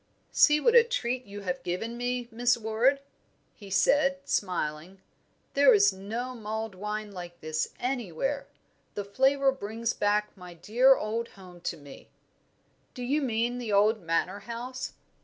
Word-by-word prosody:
"See 300 -1 +5
what 465 +9 +3
a 480 -1 +8
treat 255 - -2
you 205 0 -8
have 180 -2 -3
given 205 +7 -3
me, 245 0 -2
Miss 240 +2 +2
Ward!" 235 +5 +1 0.5
he 200 -3 -13
said, 275 +8 +3
smiling. 180 -1 -2 0.5
"There 275 -4 +6
is 200 -1 +5
no 225 +7 -5
mulled 220 -2 -4
wine 210 +2 -5
like 175 -2 -9
this 155 0 -2
anywhere. 255 - -2 0.5
The 205 - -3
flavour 270 +6 +3
brings 230 -2 -3
back 210 0 0
my 180 -2 -11
dear 250 +9 +4
old 230 +1 -3
home 180 -2 -13
to - - -3
me." 145 -2 -13 0.9
"Do 250 - -6
you 285 +5 +1
mean 240 -1 -1
the 235 -3 -4
old 210 +2 +3
Manor 175 +4 -1
House?" 240 +4 -6
220 Hz, 150 wpm, -28 LUFS, 195-250 Hz, 0.9 s, a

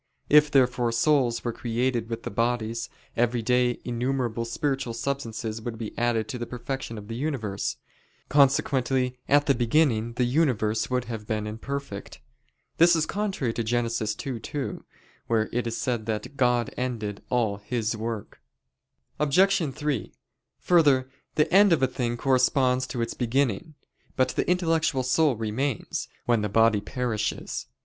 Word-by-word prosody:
If 150 0 +6
therefore 125 -4 +3
souls 120 0 +2
were 120 - -2
created 120 0 -1
with 115 0 -4
the - - -5
bodies, 115 +1 -1 0.3
every 120 0 +1
day 125 +1 +2
innumerable 120 -1 -1
spiritual 135 0 -2
substances 115 -3 -3
would 115 0 -5
be 110 -1 -6
added 115 -2 0
to 125 -4 -4
the 120 - -4
perfection 125 -1 -5
of 105 -1 -9
the 115 - -5
universe: 120 -8 -2 0.5
consequently 130 -2 +2
at 145 0 +5
the 140 - +4
beginning 120 -2 +2
the 125 - 0
universe 120 -5 +1
would 125 -1 0
have 110 -3 -6
been 105 -1 -1
imperfect. 110 0 -6 0.6
This 170 +1 +7
is 160 -1 +1
contrary 195 - -2
to 115 - -2
Gen. 120 +2 +1
2:2, 115 +4 -3 0.5
where 110 -2 +1
it 120 0 -1
is 115 - -3
said 120 -4 -2
that 110 +5 -3
"God 125 -3 +1
ended" 110 -5 -3
all 115 -5 +1
"His 110 +1 -2
work." 110 -1 -5 0.8
Obj. 170 +3 +3
3: 140 -6 -3 0.5
Further, 140 -7 +4 0.2
the 150 - +2
end 200 0 +7
of 160 -5 +3
a - - +5
thing 120 -2 -2
corresponds 130 0 +2
to 120 -3 -2
its 115 - -3
beginning. 130 +3 -1 0.4
But 130 - +2
the - - -1
intellectual 165 -6 +1
soul 135 +2 +3
remains, 115 +3 -2 0.2
when 120 -3 +2
the 105 - -1
body 110 0 +4
perishes. 115 -1 -3
120 Hz, 150 wpm, -26 LUFS, 115-135 Hz, 0.8 s, This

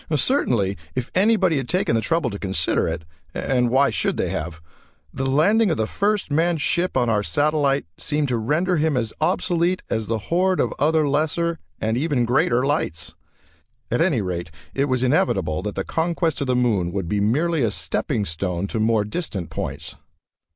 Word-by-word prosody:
Certainly 120 - +2 0.2
if 125 -2 -3
anybody 190 -4 +3
had 135 -3 -3
taken 180 -8 +1
the 115 - +2
trouble 165 -3 0
to 100 - -6
consider 95 -4 0
it 80 - -3 0.3
and 125 -2 +1
why 135 +3 +3
should - - 0
they - - 0
have? 80 +1 -4 0.5
the 135 0 -1
landing 200 +10 +3
of 160 - 0
the 110 - +1
first 200 - -1
manned 165 +2 +2
ship 175 +3 0
on 125 -2 +2
our 110 -2 +2
satellite 140 - +1
seemed 150 -1 0
to 120 - +1
render 155 +11 +1
him 155 -2 +1
as 115 -3 -2
obsolete 175 +1 +1
as 110 -1 -1
a 115 - +1
horde 180 - 0
of - - +1
other 155 +1 +3
lesser 160 +3 0 0.2
and 110 +1 0
even 140 -4 +1
greater 125 +1 +2
lights. 110 - -1 0.8
At - - +1
any 160 - +2
rate, 85 -3 -4 0.2
it 135 - +1
was 130 -2 0
inevitable 100 - +1
that 105 +1 -4
the 95 - -1
conquest 165 -2 -1
of 140 - -1
the 125 - +1
moon 105 -8 +1
would 95 -4 -2
be 105 +3 0
merely 150 +10 +1
a 115 - +2
stepping 105 0 -1
stone 90 +1 -2
to 110 - -2
more 110 -1 +2
distant 105 - -4
points. - - -5
135 Hz, 185 wpm, -22 LUFS, 105-165 Hz, 0.8 s, anybody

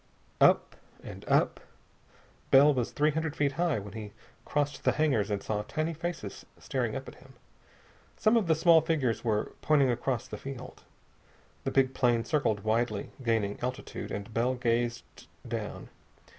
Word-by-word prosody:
Up, - - -2 0.3
and - - -9
up.... - - +2 0.9
Bell 145 +2 +7
was 125 -3 -1
three 150 +1 +2
hundred 160 0 -2
feet 145 -1 +1
high 165 0 0
when 100 -1 -7
he 105 -2 -7 0.3
crossed 145 -1 -1
the - - +3
hangars 135 -10 +1
and 100 -1 -2
saw 105 -1 -1
tiny 155 +9 -2
faces 170 +2 -5
staring - - -2
up - - -5
at - - -8
him. - - -17 0.8
Some 215 +2 +3
of 220 -6 +2
the 160 - +4
small 165 0 +6
figures 150 -8 0
were 110 -3 0
pointing 140 -4 +4
across 120 0 -2
the 105 - -7
field. 130 -2 -8 0.8
The - - +1
big 135 -1 +3
plane 120 -3 +2
circled 115 -8 +1
widely, 110 -1 0
gaining 110 -4 0
altitude, 125 +1 -4
and 100 +2 -6
Bell 125 +3 +1
gazed 120 -1 -2 0.2
down. - - -5
130 Hz, 155 wpm, -29 LUFS, 115-150 Hz, 0.9 s, Bell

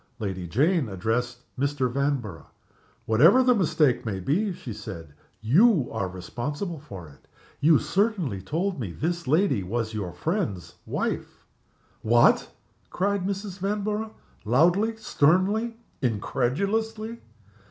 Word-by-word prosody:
Lady 95 -6 -4
Jane 145 - +2
addressed 120 +5 -2 0.2
Mr. 140 -1 +1
Vanborough. 125 - -2 0.6
"Whatever 165 - +6
the 250 0 +5
mistake 160 - +2
may 100 -4 -3
be," 180 - 0
she 130 -9 -7
said, 85 -7 -9 0.3
"you 160 - +4
are 110 -4 -2
responsible 140 - -5
for 95 - -10
it. 70 - -19 0.3
You 155 +1 +5
certainly 190 - 0
told 170 - -2
me 100 -8 -4
this 170 - -3
lady 155 - +2
was 110 +4 -3
your 100 -5 -3
friend's 105 - -3
wife." - - -3 0.6
"What!!!" 120 +2 +4 0.4
cried 195 0 -1
Mrs. 200 -1 -4
Vanborough 210 +2 -2 0.3
loudly, 175 - +3
sternly, 210 +5 +2 0.2
incredulously. 200 - -1
145 Hz, 115 wpm, -26 LUFS, -, 0.6 s, Whatever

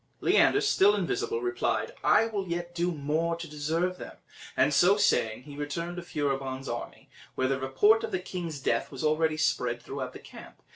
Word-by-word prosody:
Leander, 410 - +4
still 410 -1 +4
invisible, 435 +3 -1
replied, 370 -1 -1
"I 220 - +5
will 205 -4 -3
yet 175 0 -4
do 175 +1 0
more 160 +2 -1
to 170 0 -7
deserve 160 +5 -2
them;" - - -9 0.4
and - - +3
so 195 +3 +5
saying 115 - +1
he 145 0 -11
returned 170 +4 -4
to - - -3
Furibon's 135 -4 -3
army, 120 - -6 0.3
where 130 - +1
the 135 0 0
report 205 +13 +3
of - - -3
the - - 0
king's 175 -4 -5
death 115 -3 -1
was 135 0 -6
already 155 0 +2
spread 160 - 0
throughout - - -6
the - - -8
camp. - - -14
170 Hz, 185 wpm, -28 LUFS, 145-185 Hz, 0.4 s, I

